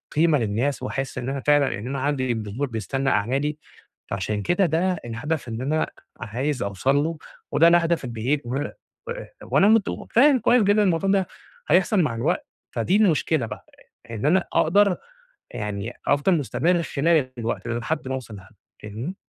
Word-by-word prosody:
قيمة 155 -1 +4
للناس 120 +5 -1
وأحس 135 0 -4
إن 125 +1 -3
أنا 135 0 -2
فعلًا 145 -2 +5
أنا 130 +5 -4
عندي 130 -3 0
جمهور 110 +5 -3
بيستنى 125 +4 -2
أعمالي 135 +8 0 0.5
فعشان 105 +2 -2
كده 180 - +2
ده 175 +3 +1
الهدف 130 +5 -3
إن 115 +2 -4
أنا 155 +4 0 0.3
عايز 130 +3 -2
أوصل 100 +8 0
له 155 +3 0 0.3
وده 165 - +5
الهدف 170 -3 +3
البعيد 125 +5 -1
و 125 +2 -3 0.5
و - - -4 0.3
وانا 195 - +3
مت 220 -2 +5 0.3
فاهم 265 +2 +5
كويس 240 0 +4
جدًا 205 +1 +4
الموضوع 185 +1 +1
ده 195 -2 +2 0.4
هيحصل 190 +2 +4
مع 125 -7 0
الوقت، 170 - -1 0.2
فدي 185 - 0
المشكلة 160 - +2
بقى 105 -1 -9 0.5
إن 115 +4 -4
أنا 185 +3 +3
أقدر 195 +3 +3 0.5
يعني 105 0 -4
أفضل 145 +5 +3
مُستمر 155 - +1
خلال 150 -3 +1
الوقت 115 +1 -3
ده 120 0 -1
لحد 145 +2 -3
ما 130 - -2
اوصل 115 -5 -7
لهدف. 95 +3 -16 0.3
فاهمني؟ 115 - -5
140 Hz, 160 wpm, -24 LUFS, 120-170 Hz, 0.5 s, فعلًا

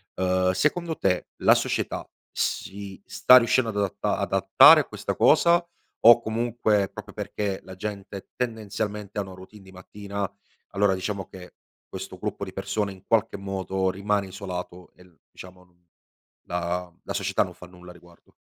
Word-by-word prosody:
Ehm, 95 0 +1
secondo 160 - 0
te 90 -2 0 0.2
la - - +7
società - - -2 0.2
si 100 -1 -4
sta 125 - +6
riuscendo 120 0 +3
ad 110 - -6
adatta 100 -2 -1
adattare - - +6
a - - -7
questa - - -5
cosa 170 0 +4 0.4
o 120 +1 +9
comunque, 110 -3 0
proprio 105 -1 -10
perché 100 -1 -4
la 95 - -10
gente 100 0 -7
tendenzialmente 105 -3 -4
hanno 95 -2 -5
routine 95 +3 -14
di 95 - -15
mattina, 100 +2 -6 0.4
allora 100 -1 +2
diciamo 95 0 -4
che 90 -1 -12 0.3
questo - - -8
gruppo - - -4
di - - -7
persone 105 -2 -2
in 95 -1 -14
qualche 115 -1 +1
modo 95 -1 -2
rimane 100 +1 -1
isolato 90 -2 -7
e 90 - -18
l 90 -2 -23 0.2
diciamo 90 0 -13
non 90 -1 -32 0.6
la 90 +1 -3
la - - -5
società - - +1
non - - -9
fa 90 - -13
nulla 90 0 -14
a - - -13
riguardo? 85 0 -20
100 Hz, 160 wpm, -25 LUFS, 90-105 Hz, 0.6 s, o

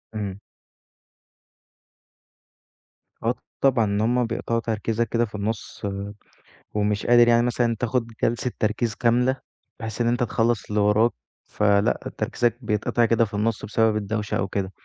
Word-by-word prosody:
إمم. 100 -2 -4 2.8
آه، - - +2 0.3
طبعًا، 130 -5 +4
إن 100 0 0
هُم 120 +2 +2
بيقطعوا 115 0 -1
تركيزك 115 0 -1
كده 120 +1 +1
في 105 - -11
النُص، 105 +1 -4 0.9
ومش 105 0 0
قادر 120 0 +6
يعني 120 0 +4
مثلًا، 120 -1 +1
تاخد 120 -1 0 0.2
جلسة 120 +2 +1
تركيز 110 +1 0
كاملة، 125 +3 +2 0.4
بحيث 110 0 -4
إن 120 - +2
أنت 120 +1 +1
تخلِّص 115 -2 0
اللي 105 0 0
وراك. 105 +3 +4 0.3
فلأ، 100 -1 +1
تركيزك 120 -1 0
بيتقطع 110 +1 +1
كده 115 0 +3
في 105 - -13
النُص، 105 +1 -1
بسبب 110 +1 +2
الدوشة 105 0 -2
أو 95 - -1
كده. 95 -1 -3
115 Hz, 135 wpm, -24 LUFS, 105-120 Hz, 2.8 s, قادر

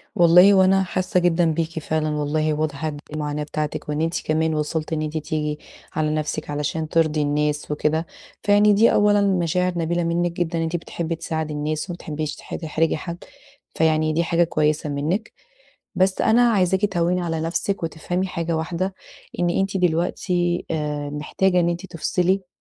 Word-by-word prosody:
والله 180 +3 +7
هو 190 - +6
أنا 190 +1 +4
حاسّة 185 0 0
جدًا 175 -1 +2
بيكِ 165 +1 -2
فعلًا 155 0 -1
والله، 150 +1 0
واضح 150 0 -2
قد 155 - -2 0.2
إيه 155 - -7
المعاناة 150 0 -2
بتاعتِك، 150 0 -4
وإن 150 +1 -1
أنتِ 165 +1 -1
كمان 160 +1 +1
وصلتِ 155 +1 -2
إن 155 - -1
أنتِ 155 +1 -3
تيجي 150 -1 -2 0.3
على 155 0 0
نفسِك 155 0 -3
علشان 150 +2 -2
ترضي 155 -2 +2
الناس 150 0 -1
وكده، 155 +2 0 0.4
فيعني 205 +1 +5
دي 220 +3 +5
أولًا 205 0 +4
مشاعر 180 -2 +1
نبيلة 175 +1 0
منِّك 170 +1 0
جدًا 170 -1 -1
أنتِ 165 +1 -2
بتحبّي 170 0 -3
تساعدي 160 -1 -3
الناس، 150 +3 -3
وما 175 - -3
بتحبيش 155 -2 -4
تح - - -8
تحرجي 160 0 0
حد، 170 +2 -7 0.5
فيعني 155 -1 +2
دي 165 +2 +1
حاجة 170 +1 +2
كويسة 155 -2 0
منِّك، 155 +10 -2 0.6
بس 185 0 +2
أنا 235 +2 +4
عايزاكِ 190 -1 +2
تهوّني 180 -2 +1
على 165 -2 -2
نفسِك 175 +4 -2
وتفهمي 170 +3 -2
حاجة 170 -2 -2
واحدة، 180 +4 -2 0.4
إن 175 -1 +2
أنتِ 195 +2 0
دلوقتي 175 0 0
آآ، 150 -2 -2
محتاجة 180 +5 +1
إن 170 - +2
أنتِ 175 +2 -3
تفصِلي. 180 +2 0
165 Hz, 170 wpm, -22 LUFS, 155-180 Hz, 0.6 s, والله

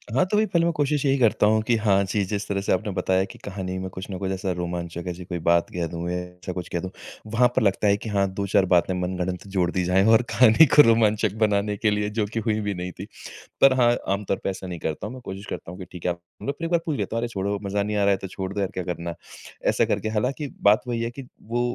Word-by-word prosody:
हाँ, 135 - +4
तो 210 +3 0
भई 215 - +4
पहले 170 -4 +1
मैं 170 - +2
कोशिश 145 -1 0
यही 135 0 +3
करता 115 -3 +3
हूँ 110 +1 +3
कि 120 - +4
हाँ, 100 -3 +3
जी 100 +1 0
जिस 100 +1 -3
तरह 100 -1 -1
से - - -1
आपने 105 +2 -1
बताया 95 0 +1
कि - - -13
कहानी 95 -2 -4
में 95 0 -4
कुछ 95 +2 -8
ना 95 - -4
कुछ 95 0 -3
ऐसा 95 0 -2
रोमांचक 85 -1 -4
ऐसी 90 0 -5
कोई 90 -1 -4
बात 85 0 +4
कह 85 -2 -2
दूँ 85 +1 -5
ए - - -2 0.2
ऐसा 90 +1 -7
कुछ 90 -1 -5
कह 85 - 0
दूँ। 95 - -5 0.4
वहाँ 120 +2 +4
पर - - +3
लगता 100 0 +2
है 100 - +4
कि 110 - -7
हाँ 100 -1 +2
2-4 100 0 +2
बातें 90 0 +3
मनगढ़ंत 90 +1 -3
जोड़ 95 -3 0
दी 90 - 0
जाए 90 +2 +3
और 110 +1 +6
कहानी 110 +7 +6
को 150 - +11
रोमांचक 110 -4 +3
बनाने 105 -1 +1
के 105 +1 +2
लिए 105 0 0
जो 105 0 -1
कि 115 - 0
हुई 110 -1 0
भी 105 -1 -2
नहीं 90 0 -5
थी। - - -5 0.6
पर 135 -1 +7
हाँ 120 0 +5 0.2
आम 100 +1 -3
तौर 95 - 0
पे - - 0
ऐसा 95 0 -6
नहीं 90 -2 -6
करता 80 +6 -3
हूँ। 110 - -7
मैं 130 - -9
कोशिश 95 +1 -7
करता - - -6
हूँ 90 - -10
कि 95 - -7
ठीक 90 - -10
है 90 - +2
आप 85 - -6 0.2
फ़िर 140 +4 -3
एक - - -2
बार 170 - +4
पूछ 155 -4 -1
लेता - - -3
हूँ - - +1
अरे 120 - -1
छोड़ो 100 -2 -2
मज़ा 100 +1 -1
नहीं 105 +1 -2
आ - - +2
रहा 100 - +4
है 95 - +2
तो 95 - -7
छोड़ 95 0 -5
दो 100 - -3
यार 95 -2 0
क्या 90 - -3
करना 85 -1 -4
है। 85 - -5 0.5
ऐसा - - +3
करके 110 - -1
हालाँकि 125 +7 -1
बात 105 +3 +5
वही 120 -1 -1
है 115 - -1
कि 135 +2 -9 0.2
वो 120 +2 0
100 Hz, 290 wpm, -24 LUFS, 95-110 Hz, 0.6 s, को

